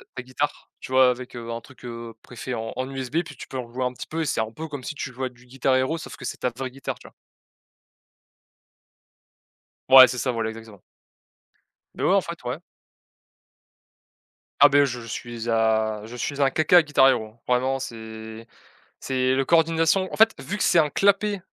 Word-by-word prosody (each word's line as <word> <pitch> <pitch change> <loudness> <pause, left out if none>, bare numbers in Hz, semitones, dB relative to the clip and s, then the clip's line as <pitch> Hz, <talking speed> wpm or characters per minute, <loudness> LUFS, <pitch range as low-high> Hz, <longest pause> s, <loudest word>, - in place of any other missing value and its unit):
ta 125 - -5
guitare, 130 +3 -4
tu - - -10
vois? 130 -1 +6
Avec 125 0 -5
un 115 0 -6
truc, 130 0 -16
heu, 115 -1 -7
pré-fait 125 +1 -7
en 110 0 -5
en 130 +1 -3
USB. 135 +2 -4
Puis 150 -3 -11
tu - - -9
peux 130 - -5
rejouer 125 +1 -4
un 125 - -2
petit 120 - -9
peu 165 +1 -3
et - - -1
c'est 120 - 0
un 110 0 -4
peu 160 +8 -7
comme 145 -4 -7
si 150 - -5
tu 125 - -5
jouais 130 +1 -3
à - - -8
du 125 0 -21
Guitar 130 +1 0
Hero 130 +6 +1
sauf 160 - -9
que 130 - -9
c'est - - -4
ta 125 - -1
vraie 130 +2 -6
guitare, 135 +1 -6
tu - - -14
vois? - - -17 2.8
Ouais, 130 -1 +11
c'est 125 - -4
ça, 130 - 0
voilà, 115 -2 -2
exactement. 110 -3 -12 1.1
Beh, - - -3
ouais, 190 - +4
en 200 - +5
fait, 170 -2 -8
ouais. 125 +6 -4 2.0
Ah, 145 - +10
beh, 145 0 +5
je 125 -2 -3
suis 120 0 -6
à 110 -1 +1
je 115 +2 -10
suis 140 +3 -3
un 135 - +4
caca 155 +5 +3
à 175 - +6
Guitar 145 -3 +4
Hero, 110 -4 0
vraiment 130 +2 +1
c'est 110 -2 -8 0.6
c'est 130 0 0
le 135 - +1
coordination, 165 +4 +3
en - - -2
fait, 220 0 +5
vu 205 - -4
que 210 - -1
c'est 170 - +4
un 150 -2 +3
clapet 200 +2 +2
130 Hz, 205 wpm, -24 LUFS, 115-145 Hz, 2.8 s, Ouais